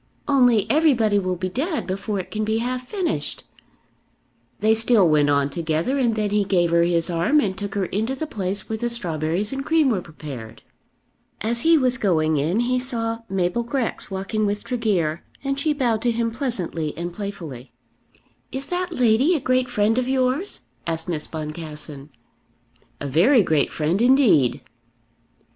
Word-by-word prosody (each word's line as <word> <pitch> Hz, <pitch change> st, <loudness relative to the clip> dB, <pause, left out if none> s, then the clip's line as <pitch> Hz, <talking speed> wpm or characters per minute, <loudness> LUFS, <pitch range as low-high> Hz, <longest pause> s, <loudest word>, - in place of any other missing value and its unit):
Only 245 Hz, -7 st, +4 dB
everybody 245 Hz, -10 st, +3 dB
will 185 Hz, -1 st, -1 dB
be 185 Hz, +1 st, -3 dB
dead 290 Hz, -, -2 dB
before 195 Hz, +2 st, -3 dB
it 185 Hz, -, -7 dB
can 215 Hz, 0 st, -2 dB
be 220 Hz, +1 st, 0 dB
half 250 Hz, +2 st, -3 dB
finished." 370 Hz, -6 st, -2 dB, 1.2 s
They 215 Hz, +1 st, +4 dB
still 225 Hz, -3 st, +4 dB
went 150 Hz, -2 st, +3 dB
on 140 Hz, 0 st, +2 dB
together, 165 Hz, -, -1 dB
and 235 Hz, -4 st, +2 dB
then 210 Hz, -2 st, -1 dB
he 210 Hz, 0 st, +2 dB
gave 180 Hz, -3 st, +1 dB
her 170 Hz, 0 st, +4 dB
his 170 Hz, -1 st, +2 dB
arm 175 Hz, -, +2 dB
and 195 Hz, -9 st, 0 dB
took 200 Hz, 0 st, -5 dB
her 200 Hz, -2 st, 0 dB
into 220 Hz, +8 st, -2 dB
the 315 Hz, -, -3 dB
place 195 Hz, -7 st, -4 dB
where 220 Hz, 0 st, -3 dB
the 240 Hz, -, -1 dB
strawberries 180 Hz, -, -2 dB
and 270 Hz, 0 st, -3 dB
cream 315 Hz, -1 st, +3 dB
were 195 Hz, -5 st, 0 dB
prepared. 135 Hz, -9 st, -9 dB, 0.8 s
As 235 Hz, +2 st, -1 dB
he 330 Hz, +1 st, +5 dB
was 255 Hz, -2 st, +1 dB
going 160 Hz, -7 st, +2 dB
in 165 Hz, +10 st, +1 dB
he 250 Hz, +1 st, +1 dB
saw 230 Hz, -3 st, -2 dB
Mabel 185 Hz, +3 st, 0 dB
Grex 235 Hz, 0 st, -2 dB
walking 195 Hz, +2 st, -1 dB
with 205 Hz, 0 st, -1 dB
Tregear, 190 Hz, -10 st, -1 dB, 0.2 s
and 275 Hz, 0 st, -1 dB
she 305 Hz, +2 st, +1 dB
bowed 245 Hz, -7 st, 0 dB
to 245 Hz, -, +1 dB
him 230 Hz, 0 st, 0 dB
pleasantly 185 Hz, -, -3 dB
and 175 Hz, +1 st, -4 dB
playfully. 170 Hz, -, -7 dB, 0.8 s
"Is 265 Hz, +1 st, -4 dB
that 360 Hz, +3 st, -2 dB
lady 250 Hz, +8 st, +3 dB
a -, -, +1 dB
great 255 Hz, -1 st, +1 dB
friend 220 Hz, +1 st, +2 dB
of 255 Hz, 0 st, -2 dB
yours?" 265 Hz, +8 st, 0 dB, 0.3 s
asked 165 Hz, +1 st, -2 dB
Miss 155 Hz, -3 st, -2 dB
Boncassen. 150 Hz, -2 st, -7 dB, 0.9 s
"A -, -, -5 dB
very 195 Hz, -, +4 dB
great 155 Hz, -5 st, +1 dB
friend 160 Hz, +7 st, 0 dB
indeed." 235 Hz, -, +4 dB
210 Hz, 170 wpm, -23 LUFS, 170-255 Hz, 1.2 s, he